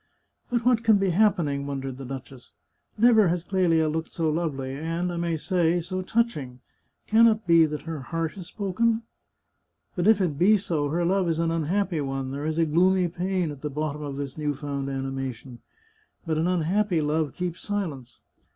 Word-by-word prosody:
" - - -46
But 240 -1 -1
what 245 -2 +3
can 220 -2 +5
be 195 -2 +1
happening?" 165 -8 +2
wondered 135 -2 -4
the 135 - -7
duchess. 130 -1 -9 0.2
" - - -49
Never 220 -2 +5
has 170 0 0
Clelia 175 -4 +2
looked 160 +1 -3
so 160 -2 0
lovely, 140 -5 -2
and 165 +5 -2
I - - -4
may 170 -1 -1
say, 175 0 +1
so 185 +2 -3
touching. 185 - -1 0.5
Can 225 +2 +6
it 220 -1 +1
be 165 -2 +6
that 150 0 -5
her 160 -2 -5
heart 165 +4 -3
has 185 -4 -9
spoken?... 225 +3 0 0.9
But 180 +2 0
if 220 -2 +6
it 160 -7 -1
be 210 +5 +5
so, 155 -7 -1
her 170 +3 0
love 185 0 +1
is 165 - 0
an 165 0 0
unhappy 165 +1 0
one; 135 -1 -3
there 140 +2 -3
is 160 0 -2
a 165 - +3
gloomy 180 +3 +3
pain 180 -1 -1
at 140 -2 -10
the 150 - -3
bottom 150 +1 -3
of 145 -2 -5
this 140 +1 -5
new 150 -1 -1
found 140 -1 -4
animation.... 135 -2 -5 0.7
But 160 -2 0
an 165 - +1
unhappy 180 +2 +1
love 150 0 0
keeps 180 -1 -4
silence. 155 - -4
165 Hz, 195 wpm, -26 LUFS, 145-185 Hz, 0.9 s, Can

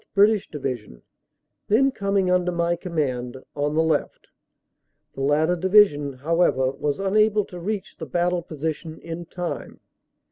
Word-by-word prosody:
(British) 205 0 +4
Division, 125 - -5 0.6
then 265 +6 +4
coming 195 -5 0
under 180 0 +2
my 170 0 +1
command, 130 -8 -3 0.2
on 145 +1 -1
the 160 - +3
left; 160 -2 -1 0.8
the 135 - -6
latter 155 +5 +2
Division, 180 -6 +4
however, 130 -2 +1
was 140 +3 -2
unable 210 +1 +2
to 180 - -9
reach 195 +2 -4
the 160 - -7
battle 175 +4 0
position 160 0 -5
in 165 0 -7
time. 180 0 -5
170 Hz, 135 wpm, -24 LUFS, 145-190 Hz, 0.8 s, British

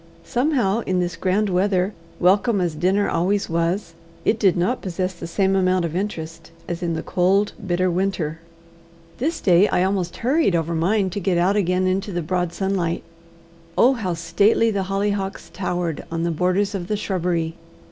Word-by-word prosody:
Somehow 245 -6 +1
in 185 -1 +1
this 175 -1 -1
grand 190 +5 +1
weather, 190 +1 +1 0.3
welcome 200 +4 +3
as 175 -3 0
dinner 185 +6 +1
always 190 +2 0
was, 170 +2 -1 0.3
it 220 - +2
did 190 -5 +3
not 195 +9 0
possess 185 0 -2
the 170 -1 -8
same 195 +2 +1
amount 185 -2 +2
of 165 0 -4
interest 165 -4 -4 0.2
as 175 0 -4
in 170 -2 -1
the 160 - -4
cold 195 +3 +2
bitter 185 -1 +1
winter. 170 -4 -1 0.8
This 315 +7 -1
day 185 +2 +5
I 180 - +1
almost 185 -2 -1
hurried 260 - +2
over 165 0 0
mine 190 +4 +1
to 205 - -3
get 190 -2 0
out 185 +4 +2
again 185 -2 +1
into 190 +2 0
the 175 -2 -2
broad 180 +1 -1
sunlight. 180 -2 -1 0.7
Oh, 255 +3 +6
how 190 -8 -2
stately 215 +6 +2
the 195 -2 -1
hollyhocks 195 0 -2
towered 175 -4 -2
on 165 0 -2
the 170 - 0
borders 185 +5 +1
of 180 -3 -4
the 210 - -1
shrubbery! 175 -5 -1
185 Hz, 175 wpm, -22 LUFS, 175-200 Hz, 0.8 s, Oh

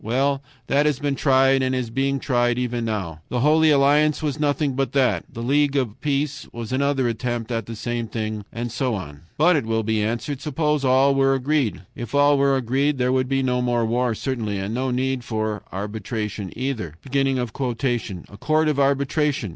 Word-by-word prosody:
Well, 135 +5 +1 0.2
that 145 +2 +2
has 150 -3 +1
been 145 0 -1
tried 135 -1 +3
and 130 0 0
is 125 -3 -3
being 135 +3 0
tried 120 -3 +1
even 120 -1 -1
now. 95 -8 -3
The 125 - -1
Holy 155 +3 +4
Alliance 150 +2 +3
was 150 -1 -2
nothing 145 -1 +1
but 135 +1 -1
that, 125 -10 +2
the 115 - -6
League 145 +2 +2
of 125 -6 -1
Peace 145 -1 -1
was 115 -1 -6
another 135 -1 +1
attempt 120 0 -3
at 115 -3 -2
the 115 - -6
same 120 +1 -3
thing, 110 -2 -4
and 120 0 -4
so 125 -1 -1
on. 75 -7 -7 0.2
But, 170 +4 +5
it 145 - +1
will 115 0 0
be 110 0 0
answered, 120 +5 -3
suppose 150 -1 0
all 135 +1 +4
were 135 0 +3
agreed. 130 - 0
If 120 +2 -6
all 145 0 +5
were 140 0 +3
agreed 135 +4 0
there 125 0 +1
would 130 -1 +1
be 135 -1 +1
no 125 -1 +1
more 120 -2 +1
war 120 +1 0
certainly, 110 -5 -2
and 95 +3 -3
no 130 +2 -1
need 130 0 -1
for 110 -2 -2
arbitration 105 0 -4
either. 115 - -3
"A 125 -6 -2
court 155 +1 +2
of 145 -2 0
arbitration! 140 - +1
130 Hz, 190 wpm, -23 LUFS, 115-140 Hz, 0.2 s, But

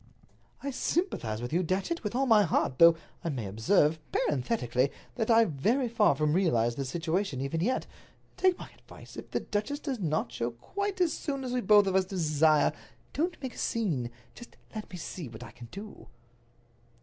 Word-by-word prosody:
"I 280 - -2
sympathize 125 - -1
with 120 - -4
you, 175 - +3
Datchet, 190 - -1
with 210 +2 -3
all 270 +2 +2
my 225 -4 +6
heart, 160 -8 0
though, 170 0 +8 0.3
I 170 - -1
may 125 -8 -3
observe, 145 - +2
parenthetically, 130 - 0 0.2
that 225 -2 -2
I 230 0 +6
very 220 - +1
far 220 - +3
from 150 +1 +1
realize 120 -11 +2
the 135 +3 -4
situation 165 +2 -1
even 140 +5 -2
yet. 250 +8 0 0.5
Take 370 -1 +3
my - - -10
advice. - - -14
If - - -8
the - - -1
duchess 215 +8 -2
does 275 -5 -3
not 155 -4 -1
show 115 - -2
quite 380 - -4
as 345 -3 +3
soon 275 -3 -3
as 250 -1 -3
we 250 - +1
both 210 -3 +6
of 190 - 0
us 190 -1 +3
desire, 155 -4 +3 0.4
don't 340 +4 -1
make 260 - -4
a - - -10
scene; 165 - -1 0.2
just 240 - -13 0.2
let 215 -2 -6
me 180 - -7
see 165 -3 -6
what 115 +1 -10
I 120 - -10
can 120 - -12
do." 205 +2 -10
185 Hz, 190 wpm, -29 LUFS, -, 0.5 s, though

